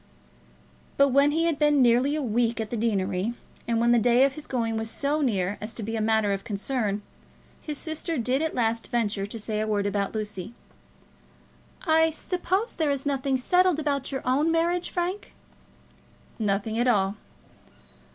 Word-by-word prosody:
But 280 Hz, 0 st, +5 dB
when 280 Hz, +2 st, +4 dB
he 320 Hz, +3 st, +1 dB
had 330 Hz, -4 st, 0 dB
been 295 Hz, -1 st, +4 dB
nearly 250 Hz, +3 st, +4 dB
a 305 Hz, -, -2 dB
week 235 Hz, 0 st, 0 dB
at 220 Hz, -1 st, -4 dB
the -, -, -1 dB
deanery, 205 Hz, -1 st, -1 dB, 0.3 s
and 230 Hz, -1 st, +1 dB
when 235 Hz, +1 st, +3 dB
the 240 Hz, -, +5 dB
day 245 Hz, +3 st, +4 dB
of 275 Hz, -, 0 dB
his 305 Hz, +1 st, -9 dB
going 230 Hz, -3 st, -1 dB
was 220 Hz, 0 st, -2 dB
so 290 Hz, +5 st, -1 dB
near 200 Hz, -7 st, 0 dB
as 215 Hz, +2 st, -6 dB
to 225 Hz, -, -5 dB
be 225 Hz, +2 st, -3 dB
a 220 Hz, -, -1 dB
matter 220 Hz, -2 st, +2 dB
of 195 Hz, 0 st, -4 dB
concern, 210 Hz, -1 st, -2 dB, 0.6 s
his 300 Hz, -2 st, -4 dB
sister 315 Hz, +1 st, -3 dB
did 255 Hz, +3 st, 0 dB
at 320 Hz, -1 st, -1 dB
last 230 Hz, -1 st, 0 dB
venture 210 Hz, -5 st, -1 dB
to 220 Hz, -, -7 dB
say 215 Hz, 0 st, -3 dB
a 215 Hz, -, -1 dB
word 205 Hz, -2 st, 0 dB
about 200 Hz, +1 st, -1 dB
Lucy. 210 Hz, 0 st, -5 dB, 1.3 s
"I 320 Hz, -1 st, +4 dB
suppose 370 Hz, +6 st, -2 dB
there 315 Hz, -3 st, 0 dB
is 280 Hz, -1 st, -2 dB
nothing 275 Hz, -1 st, 0 dB
settled 360 Hz, +5 st, +3 dB
about 285 Hz, -3 st, -2 dB
your 265 Hz, -, -3 dB
own 280 Hz, +6 st, +2 dB
marriage, 340 Hz, +2 st, +1 dB
Frank?" 360 Hz, +3 st, -3 dB, 1.0 s
"Nothing 215 Hz, +1 st, -1 dB
at 245 Hz, -, +2 dB
all." 200 Hz, -4 st, +2 dB
240 Hz, 180 wpm, -26 LUFS, 215-295 Hz, 1.3 s, But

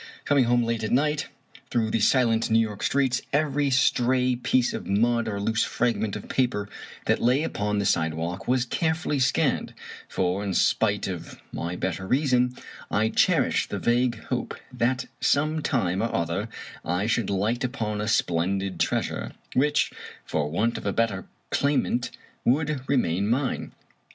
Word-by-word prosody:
Coming 140 Hz, -3 st, +4 dB
home 120 Hz, 0 st, +3 dB
late 115 Hz, -1 st, -1 dB
at 105 Hz, -, -1 dB
night, 150 Hz, +3 st, +1 dB, 0.4 s
through 110 Hz, -2 st, 0 dB
the 115 Hz, -, +1 dB
silent 115 Hz, 0 st, +3 dB
New 110 Hz, -, +4 dB
York 110 Hz, -3 st, 0 dB
streets, 130 Hz, -2 st, +1 dB
every 145 Hz, -1 st, +1 dB
stray 130 Hz, -1 st, +2 dB
piece 125 Hz, 0 st, +1 dB
of -, -, -5 dB
mud 115 Hz, +3 st, +2 dB
or 100 Hz, -2 st, -2 dB
loose 110 Hz, +2 st, +1 dB
frag 120 Hz, 0 st, 0 dB
ment 105 Hz, -3 st, -2 dB
of -, -, -7 dB
paper 120 Hz, -6 st, 0 dB, 0.4 s
that -, -, +1 dB
lay 130 Hz, +5 st, +3 dB
upon 105 Hz, -8 st, -1 dB
the 100 Hz, -, 0 dB
sidewalk 80 Hz, +2 st, -1 dB
was 125 Hz, 0 st, +2 dB
carefully 160 Hz, +1 st, -1 dB
scanned; 130 Hz, -, +1 dB, 0.3 s
for, 90 Hz, +3 st, 0 dB
in 95 Hz, -3 st, -2 dB
spite -, -, +2 dB
of -, -, -6 dB
my 85 Hz, +1 st, -4 dB
better 95 Hz, +1 st, -3 dB
reason, 125 Hz, -1 st, +2 dB, 0.3 s
I 110 Hz, +2 st, +2 dB
cherished -, -, +2 dB
the -, -, -3 dB
vague 120 Hz, 0 st, +1 dB
hope -, -, -2 dB, 0.2 s
that 130 Hz, +3 st, 0 dB
some 155 Hz, +2 st, +2 dB
time 95 Hz, -, 0 dB
or 115 Hz, -, -1 dB
other 85 Hz, +6 st, -1 dB, 0.3 s
I 90 Hz, +4 st, -1 dB
should 115 Hz, -2 st, 0 dB
light 105 Hz, +6 st, 0 dB
upon 110 Hz, -5 st, -2 dB
a 105 Hz, -, -2 dB
splendid 95 Hz, -1 st, 0 dB
treasure, -, -, -1 dB, 0.2 s
which, 145 Hz, +3 st, +2 dB, 0.3 s
for 75 Hz, -2 st, -1 dB
want 110 Hz, +9 st, 0 dB
of -, -, -6 dB
a 100 Hz, -, 0 dB
better 115 Hz, -5 st, 0 dB, 0.2 s
claimant, 140 Hz, -4 st, +1 dB, 0.3 s
would 145 Hz, +1 st, +1 dB
remain 100 Hz, -7 st, +1 dB
mine. 130 Hz, +2 st, -1 dB
115 Hz, 160 wpm, -26 LUFS, 100-130 Hz, 0.4 s, Coming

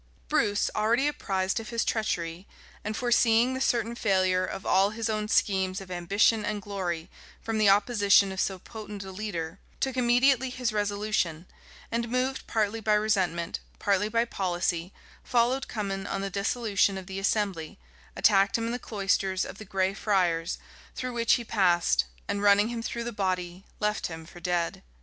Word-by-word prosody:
[*] -, -, -33 dB
Bruce, 205 Hz, 0 st, +1 dB
already 230 Hz, +5 st, +2 dB
apprised 195 Hz, -8 st, -1 dB
of 220 Hz, -, -8 dB
his 230 Hz, -1 st, -1 dB
treachery, 175 Hz, -5 st, -2 dB, 0.4 s
and 215 Hz, +1 st, -3 dB
foreseeing 240 Hz, 0 st, +3 dB
the 260 Hz, -, -3 dB
certain 235 Hz, -3 st, +1 dB
failure 185 Hz, -5 st, +2 dB
of 185 Hz, -, -5 dB
all 195 Hz, +1 st, +4 dB
his 225 Hz, +1 st, -2 dB
own 215 Hz, -1 st, -2 dB
schemes 190 Hz, -2 st, +1 dB
of 190 Hz, -1 st, -10 dB
ambition 200 Hz, +5 st, +2 dB
and 210 Hz, 0 st, -2 dB
glory 180 Hz, -5 st, -3 dB, 0.4 s
from 225 Hz, -1 st, -1 dB
the 210 Hz, -2 st, +5 dB
opposition 200 Hz, -1 st, +4 dB
of 190 Hz, -, -5 dB
so 190 Hz, -, -1 dB
potent 210 Hz, +1 st, -8 dB
a 190 Hz, -, -8 dB
leader, 185 Hz, -3 st, -5 dB, 0.2 s
took 265 Hz, -1 st, -1 dB
immediately 255 Hz, +1 st, +3 dB
his 250 Hz, -3 st, -2 dB
resolution; 205 Hz, -5 st, -1 dB, 0.5 s
and 235 Hz, 0 st, -1 dB
moved 255 Hz, +2 st, -1 dB
partly 220 Hz, 0 st, 0 dB
by 215 Hz, -1 st, +2 dB
resentment, 190 Hz, -6 st, 0 dB, 0.2 s
partly 205 Hz, +1 st, +1 dB
by 230 Hz, +1 st, +2 dB
policy, 175 Hz, -4 st, -2 dB, 0.3 s
followed 250 Hz, +2 st, +1 dB
Cummin 195 Hz, -3 st, -3 dB
on 195 Hz, -, -2 dB
the 195 Hz, 0 st, -3 dB
dissolution 200 Hz, -1 st, +1 dB
of 190 Hz, -, -7 dB
the 190 Hz, +1 st, -5 dB
assembly, 195 Hz, -5 st, -1 dB, 0.4 s
attacked 200 Hz, -1 st, +4 dB
him 230 Hz, -, -2 dB
in 230 Hz, -, -2 dB
the 245 Hz, -, -3 dB
cloisters 195 Hz, -3 st, 0 dB
of -, -, -9 dB
the 215 Hz, -, -8 dB
Gray 190 Hz, 0 st, 0 dB
Friars, 175 Hz, -6 st, 0 dB, 0.4 s
through 255 Hz, -1 st, -4 dB
which 235 Hz, -1 st, +3 dB
he 240 Hz, -, +1 dB
passed, 175 Hz, -, +2 dB, 0.2 s
and 200 Hz, -, -1 dB
running 205 Hz, +1 st, +5 dB
him 235 Hz, -1 st, -4 dB
through 235 Hz, 0 st, -4 dB
the 240 Hz, -, -4 dB
body, 185 Hz, -3 st, -2 dB
left 210 Hz, 0 st, 0 dB
him 160 Hz, -1 st, -8 dB
for 175 Hz, -, -13 dB
dead. 175 Hz, -1 st, -1 dB
205 Hz, 175 wpm, -28 LUFS, 185-225 Hz, 0.5 s, the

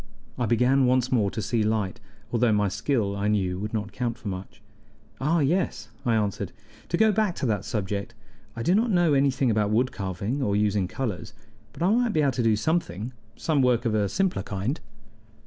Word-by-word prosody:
I 120 Hz, -, -1 dB
began 125 Hz, +4 st, +3 dB
once 125 Hz, 0 st, +2 dB
more 110 Hz, -6 st, +3 dB
to 110 Hz, -, -4 dB
see 115 Hz, +2 st, 0 dB
light, 105 Hz, -3 st, 0 dB, 0.3 s
although 120 Hz, -1 st, +3 dB
my 105 Hz, -1 st, +2 dB
skill, 100 Hz, -1 st, 0 dB
I 100 Hz, +1 st, -1 dB
knew, 95 Hz, -4 st, 0 dB
would 105 Hz, +1 st, -4 dB
not 105 Hz, -2 st, -3 dB
count 120 Hz, +2 st, -2 dB
for 110 Hz, -, -6 dB
much. 95 Hz, 0 st, -7 dB, 0.6 s
"Ah 155 Hz, +4 st, +2 dB
yes," 170 Hz, +7 st, 0 dB, 0.2 s
I 115 Hz, -, +3 dB
answered: 100 Hz, -3 st, -1 dB, 0.4 s
"to 170 Hz, -, +1 dB
go 220 Hz, +3 st, +5 dB
back 210 Hz, -3 st, +1 dB
to -, -, -3 dB
that 105 Hz, -5 st, 0 dB
subject, 105 Hz, +2 st, -3 dB, 0.4 s
I 115 Hz, -, -4 dB
do 175 Hz, -, +3 dB
not 225 Hz, +4 st, +3 dB
know 175 Hz, -6 st, +3 dB
anything 135 Hz, -2 st, +2 dB
about 105 Hz, -1 st, +1 dB
wood 120 Hz, +4 st, +2 dB
carving 100 Hz, +7 st, -3 dB
or 100 Hz, -6 st, +1 dB
using 105 Hz, -2 st, +1 dB
colors, 110 Hz, -4 st, -4 dB, 0.4 s
but -, -, -5 dB
I 185 Hz, -, +4 dB
might 240 Hz, -2 st, +2 dB
be 155 Hz, -, +3 dB
able 140 Hz, -, +3 dB
to 125 Hz, -, -2 dB
do 115 Hz, -2 st, +3 dB
something 115 Hz, -, -1 dB, 0.2 s
some 155 Hz, -4 st, +1 dB
work 125 Hz, -1 st, +2 dB
of 115 Hz, -, +1 dB
a 105 Hz, -2 st, +1 dB
simpler 185 Hz, -, 0 dB
kind." 105 Hz, -, -3 dB
115 Hz, 200 wpm, -26 LUFS, 105-140 Hz, 0.6 s, go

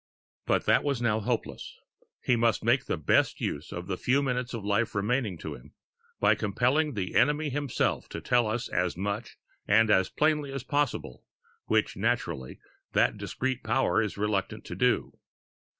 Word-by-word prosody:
But -, -, +2 dB
that -, -, +4 dB
is 140 Hz, -4 st, 0 dB
now 115 Hz, -2 st, +1 dB
hopeless; 105 Hz, -, -3 dB, 0.5 s
he 125 Hz, -, +3 dB
must 115 Hz, -2 st, +1 dB
make 120 Hz, +3 st, +2 dB
the -, -, -1 dB
best 80 Hz, -, +2 dB
use 75 Hz, +4 st, -3 dB
of 85 Hz, +1 st, -5 dB
the 95 Hz, -1 st, -3 dB
few 135 Hz, +3 st, +2 dB
minutes 125 Hz, -2 st, -1 dB
of 115 Hz, -4 st, -5 dB
life 105 Hz, +2 st, 0 dB
remaining 105 Hz, -1 st, 0 dB
to -, -, -6 dB
him, -, -, -14 dB, 0.4 s
by -, -, +5 dB
compelling 125 Hz, +8 st, +1 dB
the 95 Hz, -3 st, -3 dB
enemy 150 Hz, +1 st, +2 dB
himself 145 Hz, -2 st, -1 dB
to -, -, -5 dB
tell 120 Hz, -2 st, +2 dB
us 115 Hz, +3 st, -2 dB
as 90 Hz, -1 st, -1 dB
much 100 Hz, +4 st, -4 dB, 0.3 s
and 110 Hz, +1 st, +4 dB
as 95 Hz, -2 st, +4 dB
plainly 150 Hz, -2 st, +1 dB
as 135 Hz, -2 st, -5 dB
possible 145 Hz, -, -2 dB, 0.4 s
which, -, -, +1 dB
naturally, 65 Hz, -1 st, -2 dB, 0.4 s
that -, -, +3 dB
discreet 130 Hz, -1 st, -3 dB
power 135 Hz, -3 st, +2 dB
is 105 Hz, -3 st, -3 dB
reluctant 100 Hz, -2 st, -2 dB
to -, -, -6 dB
do. -, -, 0 dB
115 Hz, 165 wpm, -28 LUFS, 100-135 Hz, 0.5 s, by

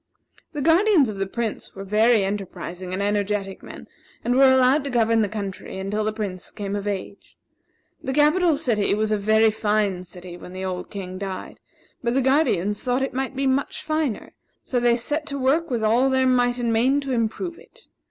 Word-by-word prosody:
The 295 Hz, -2 st, -3 dB
guardians 330 Hz, -, +4 dB
of 205 Hz, -, -5 dB
the 195 Hz, 0 st, -2 dB
Prince 230 Hz, +2 st, -4 dB
were 195 Hz, -, -6 dB
very 215 Hz, +2 st, +3 dB
enterprising 190 Hz, -2 st, -5 dB
and 190 Hz, +2 st, -2 dB
energetic 205 Hz, -1 st, -1 dB
men, -, -, -11 dB, 0.4 s
and 245 Hz, -, +1 dB
were 270 Hz, 0 st, +7 dB
allowed 260 Hz, +3 st, +4 dB
to -, -, -2 dB
govern 230 Hz, -2 st, +2 dB
the 210 Hz, -, 0 dB
country 200 Hz, -3 st, -6 dB
until 200 Hz, +3 st, -2 dB
the 215 Hz, -, 0 dB
Prince 205 Hz, -4 st, -5 dB
came 200 Hz, -1 st, -5 dB
of 205 Hz, 0 st, -4 dB
age. 200 Hz, 0 st, -6 dB, 0.6 s
The 265 Hz, -, -3 dB
capital 305 Hz, +3 st, +3 dB
city 225 Hz, -9 st, +1 dB
was 215 Hz, 0 st, 0 dB
a 215 Hz, -, +2 dB
very 220 Hz, +2 st, +4 dB
fine 210 Hz, -3 st, 0 dB
city 180 Hz, -1 st, -10 dB
when 180 Hz, -, -11 dB
the 190 Hz, 0 st, -5 dB
old 180 Hz, -1 st, -4 dB
king 185 Hz, -2 st, -6 dB
died; 195 Hz, -2 st, -6 dB, 0.4 s
but 235 Hz, 0 st, -1 dB
the 270 Hz, -, +3 dB
guardians 245 Hz, -, +2 dB
thought 250 Hz, +1 st, 0 dB
it 270 Hz, -, -3 dB
might 265 Hz, +1 st, -3 dB
be 275 Hz, +1 st, -1 dB
much 265 Hz, +1 st, 0 dB
finer, 310 Hz, -7 st, -2 dB, 0.3 s
so 250 Hz, -, -1 dB
they 240 Hz, 0 st, +3 dB
set 295 Hz, +6 st, -2 dB
to 280 Hz, -1 st, -3 dB
work 280 Hz, +6 st, +1 dB
with 235 Hz, -4 st, -1 dB
all 235 Hz, +5 st, +3 dB
their 260 Hz, 0 st, +2 dB
might 245 Hz, -1 st, +2 dB
and 235 Hz, -2 st, 0 dB
main 255 Hz, +5 st, +3 dB
to 275 Hz, -1 st, -4 dB
improve 250 Hz, -, -2 dB
it. -, -, -17 dB
225 Hz, 200 wpm, -23 LUFS, 200-265 Hz, 0.6 s, were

